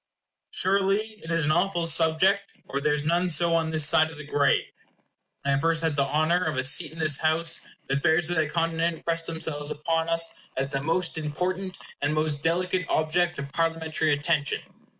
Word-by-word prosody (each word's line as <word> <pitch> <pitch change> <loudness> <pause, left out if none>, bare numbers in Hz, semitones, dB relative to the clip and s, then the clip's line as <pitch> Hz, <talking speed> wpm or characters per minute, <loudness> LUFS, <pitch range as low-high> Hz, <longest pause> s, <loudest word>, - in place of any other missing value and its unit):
Surely 195 +1 +3 0.3
it 165 - -8
is 165 -2 +2
an 155 - +1
awful 175 0 +1
subject, 165 +5 +2
or 140 - -3
there 150 0 +1
is 145 - -3
none 175 +3 +1
so 170 +1 +3
on 165 -1 +1
this 155 -2 +3
side 155 +1 +4
of 160 - -12
the 150 - -8
grave. 145 -1 +1 0.8
When 140 - +2
I - - 0
first 165 +2 +1
had 160 -2 0
the 140 -1 +1
honor 155 +5 +1
of 155 -5 -2
a 130 - 0
seat 150 +4 +2
in 160 - -13
this 155 -3 +3
House, 160 +1 +1 0.2
the 135 - -1
affairs 160 +3 +2
of 175 - -1
that 155 -2 +1
continent 165 0 -1
pressed 165 0 -1
themselves 160 -3 -1
upon 165 +2 -2
us 165 0 -3
as 135 +1 -1
the 135 -1 -3
most 165 +2 0
important 185 +5 -3 0.2
and 145 +2 0
most 155 -2 0
delicate 180 +2 0
object 175 +3 0
of 140 0 -6
Parliamentary 160 -1 0
attention. 145 0 0
160 Hz, 195 wpm, -25 LUFS, 150-170 Hz, 0.8 s, side